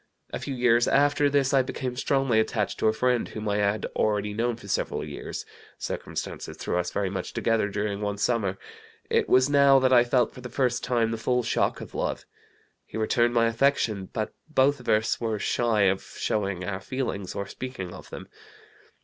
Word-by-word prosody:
A - - -2
few 135 - -4
years 120 -1 +3
after 145 +1 +3
this 140 -2 +2
I 135 - +6
became 130 -1 -4
strongly 135 -3 +2
attached 110 -1 -1
to - - +2
a - - +5
friend 125 +2 +1
whom 110 0 -6
I 100 0 +1
had 105 +1 +1
already 105 -1 0
known 115 +2 0
for 110 -3 -13
several - - -1
years. - - -6 0.3
Circumstances - - -5
threw - - -2
us 90 - -1
very 100 -2 -2
much 95 - -4
together 115 -2 +1
during 105 0 -2
one 105 -1 -2
summer. 100 -2 0 0.5
It - - +2
was 130 +1 +5
now 140 -1 +6
that 130 -1 +3
I 120 -1 +7
felt 120 -1 +1
for 125 - -11
the 125 - -7
first 125 0 0
time 115 -3 +1
the 115 - -2
full 125 +2 +1
shock - - 0
of - - -9
love. - - -2 0.6
He - - -7
returned 120 +2 +2
my 115 -1 +4
affection, 115 -5 +1
but 110 -1 -3 0.2
both 140 -1 +3
of 125 - -7
us 110 +2 +2
were 110 -2 -1
shy 115 0 +1
of 95 -1 +3
showing 100 -4 -2
our 95 0 -3
feelings 115 -8 -4
or 100 - -3
speaking 100 -5 -6
of - - -11
them. - - -8
115 Hz, 195 wpm, -26 LUFS, 105-130 Hz, 0.6 s, I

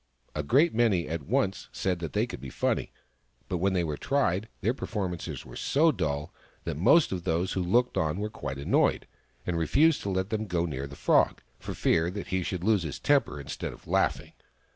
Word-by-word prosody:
A 75 - -1
great 140 - +3
many 110 -7 +2
at 80 0 -3
once 105 -4 0
said 90 -2 -1
that 85 -4 -5
they - - +2
could - - -8
be 70 - -7
funny; - - -1 0.6
but 90 - -2
when 95 +2 +2
they 90 -2 +1
were 75 -3 -3
tried, 110 - 0
their 110 +5 +2
performances 95 -9 -4
were - - -11
so 160 +3 +3
dull 75 - -2 0.3
that - - -3
most 140 - +5
of 90 -2 -3
those 85 +3 0
who 95 - 0
looked 120 +8 +2
on 80 +1 0
were 105 +1 -3
quite 70 -9 -5
annoyed, 70 - +2 0.4
and 85 -2 -1
refused 145 - +3
to 100 - -3
let 95 +1 -1
them 110 -1 -1
go 85 -2 0
near 70 -4 -4
the 70 - -10
Frog, - - +2 0.2
for - - -6
fear 85 +1 +2
he 95 -1 -3
should 90 0 -3
lose 105 -1 +3
his 80 -3 -5
temper 140 - +2
instead 70 -2 -5
of - - -16
laughing. - - 0
90 Hz, 205 wpm, -28 LUFS, 80-110 Hz, 0.6 s, most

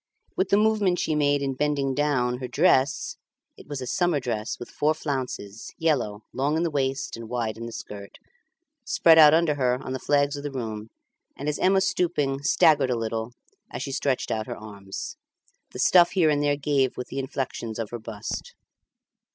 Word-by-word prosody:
With 190 0 0
the 200 - +4
movement 210 -4 +2
she 160 - 0
made 145 -1 +2
in 135 -1 -1
bending 140 -1 0
down, 125 -4 0
her 130 - -4
dress 140 -2 +2 0.4
(it - - -15
was 145 -2 -5
a - - -4
summer 175 +1 +1
dress 115 -4 -3
with 120 - -9
four 150 +1 +1
flounces, 130 -8 -5
yellow, 120 -10 0
long 140 +4 0
in 165 - +1
the 170 - -1
waist 135 -1 -1
and 115 -1 -9
wide 115 -3 -2
in 115 +1 -7
the - - -7
skirt) 100 -3 -9 0.7
spread 165 - +5
out 150 -1 +9
around 165 +1 +3
her 130 -4 +1
on 130 - -6
the 130 - -3
flags 145 +1 +1
of 145 - -6
the 145 - -4
room; 110 -5 -5 0.5
and 140 - -5
as 150 - -1
Emma 190 +1 +3
stooping, 150 -8 0
staggered 145 -1 +4
a 125 - 0
little 115 +1 -3 0.4
as 120 - -5
she 140 - -5
stretched 135 -2 -1
out 110 -1 -2
her - - -5
arms. 100 -2 -8 0.5
The - - -10
stuff 175 -1 +5
here 165 -5 +4
and 145 -1 +1
there 145 -1 +1
gave 140 -3 +1
with 125 - -5
the 135 - -4
inflections 130 -4 -4
of 115 -2 -4
her 120 - -5
bust. 105 -1 -6
135 Hz, 195 wpm, -25 LUFS, 120-150 Hz, 0.7 s, out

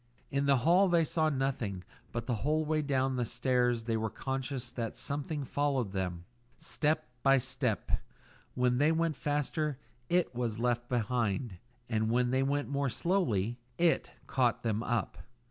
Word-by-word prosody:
In 140 0 +1
the 140 -1 +5
hall 175 +10 +5
they 170 -2 +4
saw 155 +1 +2
nothing, 130 -9 -2 0.3
but 115 -1 -3
the 120 -3 -1
whole 155 +2 +1
way 155 0 +1
down 135 -2 0
the 125 - +1
stairs 125 0 +1
they 115 0 -1
were 110 0 -1
conscious 130 0 -4
that 115 -3 -4
someone 145 0 -2
followed 135 -7 0
them; 90 -3 -3 0.3
step 155 -1 0 0.2
by 135 0 +5
step; 130 -3 -1 0.6
when 125 0 +2
they 150 +2 +4
went 165 -1 +1
faster 150 +1 -1 0.3
IT 175 -5 +2
was 120 -3 -2
left 120 0 0
behind, 115 -4 -1 0.3
and 110 -1 0
when 125 +1 +2
they 130 +1 +2
went 140 +1 0
more 140 -1 0
slowly 120 - 0 0.2
IT 170 -1 +2 0.2
caught 120 -2 +1
them 110 -2 0
up. 120 -3 -1
130 Hz, 160 wpm, -31 LUFS, 120-145 Hz, 0.6 s, the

